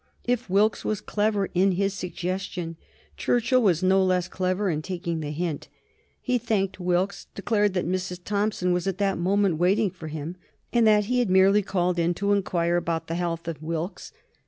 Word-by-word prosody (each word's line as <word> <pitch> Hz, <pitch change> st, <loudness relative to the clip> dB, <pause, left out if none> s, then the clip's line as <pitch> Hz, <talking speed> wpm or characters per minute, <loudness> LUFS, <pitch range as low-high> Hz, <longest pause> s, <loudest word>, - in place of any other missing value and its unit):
If 245 Hz, -3 st, -1 dB
Wilkes 205 Hz, +3 st, +2 dB
was 215 Hz, -2 st, -1 dB
clever 210 Hz, -1 st, 0 dB
in 190 Hz, +1 st, +3 dB
his 195 Hz, +2 st, 0 dB
suggestion 180 Hz, -2 st, -4 dB, 0.4 s
Churchill 245 Hz, +1 st, +2 dB
was 185 Hz, -5 st, +2 dB
no 190 Hz, +1 st, +4 dB
less 185 Hz, -1 st, +1 dB
clever 185 Hz, +2 st, -1 dB
in 155 Hz, -4 st, 0 dB
taking 170 Hz, -1 st, -3 dB
the 150 Hz, -2 st, -4 dB
hint. 155 Hz, 0 st, -3 dB, 0.5 s
He 250 Hz, -1 st, 0 dB
thanked 195 Hz, -4 st, -1 dB
Wilkes, 180 Hz, +2 st, -1 dB
declared 205 Hz, -1 st, +1 dB
that 180 Hz, -, 0 dB
Mrs. 180 Hz, 0 st, -2 dB
Thompson 205 Hz, -3 st, 0 dB
was 180 Hz, +1 st, -1 dB
at 190 Hz, -2 st, -1 dB
that 195 Hz, -3 st, 0 dB
moment 190 Hz, -1 st, +2 dB
waiting 195 Hz, +3 st, +2 dB
for 170 Hz, -3 st, -9 dB
him, 155 Hz, +3 st, -6 dB, 0.4 s
and 235 Hz, -2 st, +4 dB
that 210 Hz, -1 st, +4 dB
he 250 Hz, +3 st, +1 dB
had 240 Hz, -5 st, +1 dB
merely 190 Hz, +2 st, +5 dB
called 180 Hz, -2 st, 0 dB
in 170 Hz, +1 st, +1 dB
to 200 Hz, +2 st, +1 dB
inquire 175 Hz, -3 st, +1 dB
after 165 Hz, -1 st, -2 dB
the -, -, -2 dB
health 170 Hz, -1 st, -3 dB
of 160 Hz, -3 st, -5 dB
Wilkes. 165 Hz, +3 st, -4 dB
185 Hz, 180 wpm, -25 LUFS, 175-205 Hz, 0.5 s, merely